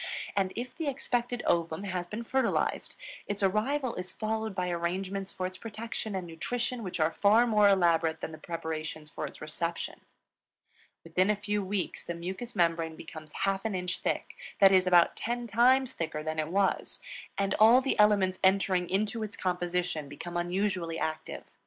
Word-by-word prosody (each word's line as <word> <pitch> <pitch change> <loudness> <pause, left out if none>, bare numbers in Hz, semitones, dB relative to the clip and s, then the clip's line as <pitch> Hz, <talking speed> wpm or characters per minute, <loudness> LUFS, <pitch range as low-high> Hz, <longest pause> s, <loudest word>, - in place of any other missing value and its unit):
And 195 -2 +1
if 250 +1 -5
the 320 - -3
expected 245 -3 -1
ovum 165 +1 +1
has 185 -3 -3
been 215 +6 -5
fertilized, 265 +3 0 0.3
its 205 0 -2
arrival 235 +7 +1
is 180 0 -5
followed 220 -1 -2
by 180 -2 -1
arrangements 190 +3 -2
for 185 - -3
its 185 0 -6
protection 220 -1 -5
and 185 -2 -3
nutrition 240 +9 -2
which 185 -4 -5
are 155 +1 +3
far 215 +4 +5
more 210 -3 +5
elaborate 170 -4 +3
than - - -5
the 155 - -10
preparations 155 -2 -5
for 150 - -4
its - - -12
reception. 170 +2 -3 1.0
Within 180 +4 +1
a 210 - +4
few 210 0 -2
weeks 190 -1 -3
the 170 - -4
mucous 190 +8 -6
membrane 165 -2 +1
becomes 155 -1 -10
half 195 0 +1
an 220 -3 -1
inch 180 0 -2
thick, - - -2 0.2
that 195 -1 +8
is, 185 -1 +4
about 175 -2 +5
ten 240 +1 -2
times 250 +4 +4
thicker 155 -2 -3
than 155 0 -2
it 155 - 0
was; 195 +3 0 0.4
and 195 0 +1
all 225 +4 +8
the 265 -3 -1
elements 200 -3 +4
entering 190 -2 +3
into 215 +4 0
its 215 0 -5
composition, 180 -4 -1
become 175 +4 -7
unusually 175 -1 -1
active. 155 -1 -3
190 Hz, 170 wpm, -30 LUFS, 170-215 Hz, 1.0 s, that